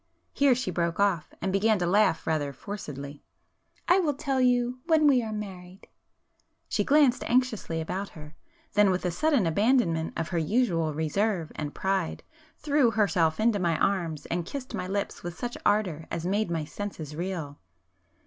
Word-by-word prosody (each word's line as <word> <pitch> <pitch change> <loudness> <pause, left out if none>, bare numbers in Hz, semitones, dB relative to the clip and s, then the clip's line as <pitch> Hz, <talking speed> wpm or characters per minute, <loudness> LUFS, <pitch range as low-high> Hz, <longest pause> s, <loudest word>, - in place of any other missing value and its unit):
Here 275 -3 +4
she 240 -7 -2
broke 170 0 -1
off, 195 -6 +1
and 190 0 0
began 215 +2 +3
to 180 - -1
laugh 180 -2 +2
rather 150 -3 0
forcedly. 145 -6 -7 0.7
"I 360 - +5
will 305 -6 +1
tell 275 -2 -1
you... 245 0 +2
when 320 -2 +4
we 270 -4 +5
are 220 -2 -5
married." 190 -3 -8 0.8
She - - 0
glanced 285 -4 +4
anxiously 235 -9 0
about 190 +5 -3
her,—then, 210 - -2
with 185 0 0
a 180 - +1
sudden 280 - +2
abandonment 170 -3 +2
of 165 0 -2
her 175 -2 0
usual 165 -5 +1
reserve 165 +2 -1
and 145 -1 -5
pride, 190 -3 -1 0.3
threw 290 -4 +2
herself 175 -7 +1
into 220 -2 +2
my 170 -3 +1
arms 170 -6 -1
and 175 0 -2
kissed 260 +8 -7
my 180 - -3
lips 200 +1 -3
with 175 0 -6
such 245 0 -4
ardour 180 -7 0
as 170 0 -4
made 205 +2 0
my 165 -3 -2
senses 160 -5 -6
reel. 165 -4 -4
195 Hz, 165 wpm, -27 LUFS, 165-240 Hz, 0.8 s, I